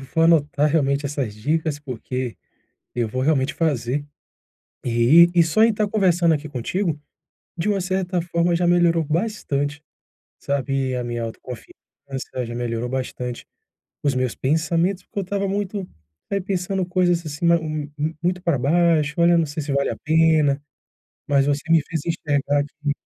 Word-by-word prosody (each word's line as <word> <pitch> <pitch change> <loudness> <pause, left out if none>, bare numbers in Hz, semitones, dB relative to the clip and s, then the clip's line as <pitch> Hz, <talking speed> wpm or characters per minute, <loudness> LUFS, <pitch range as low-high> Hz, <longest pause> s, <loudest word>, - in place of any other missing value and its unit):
vo 135 - -10
vou 165 - +3
anotar 150 -2 +3
realmente 140 -2 +1
essas 135 -7 -3
dicas, 150 +6 -1
porque 130 -2 -5 0.6
eu 120 -2 0
vou 130 +4 -2
realmente 140 -2 +1
fazer. 145 -3 0 0.8
E 125 +9 +6
e 170 - +6
só 215 +7 +2
em 225 0 +5
tá 210 0 0
conversando 180 -5 +3
aqui 150 +1 -4
contigo, 150 - -2 0.6
de 195 - -1
uma 200 -2 +1
certa 185 -1 -1
forma 170 0 +1
já 175 +1 +1
melhorou 170 -1 +4
bastante, 150 -5 -2 0.6
sabe, 135 -2 -1
a 125 - -2
minha 120 -1 -3
autoconfiança, 115 +2 -8 0.7
já 120 - -6
melhorou 120 0 -2
bastante 125 -1 -4 0.6
os 140 -2 +1
meus 130 -2 -1
pensamentos, 165 +6 0
porque - - -8
eu - - 0
estava 200 +1 -2
muito, 200 -1 -3 0.4
aí, 200 - 0
pensando 190 -1 -2
coisas 175 -2 +1
assim 145 +3 -5
ma 170 0 +6
mu 155 -2 -4 0.3
muito 180 +1 0
para 170 -6 +1
baixo, 155 +2 +2
olha, 170 -1 +5
sei 150 +2 -5
se 140 - -3
vale 140 0 +1
a - - -4
pena, 155 -3 +3 0.6
mas 140 -1 +3
você 145 0 +1
me 165 -2 +6
fez 160 -2 -3
enxergar 145 -3 0
que, 145 0 -4
155 Hz, 160 wpm, -22 LUFS, 140-175 Hz, 0.8 s, E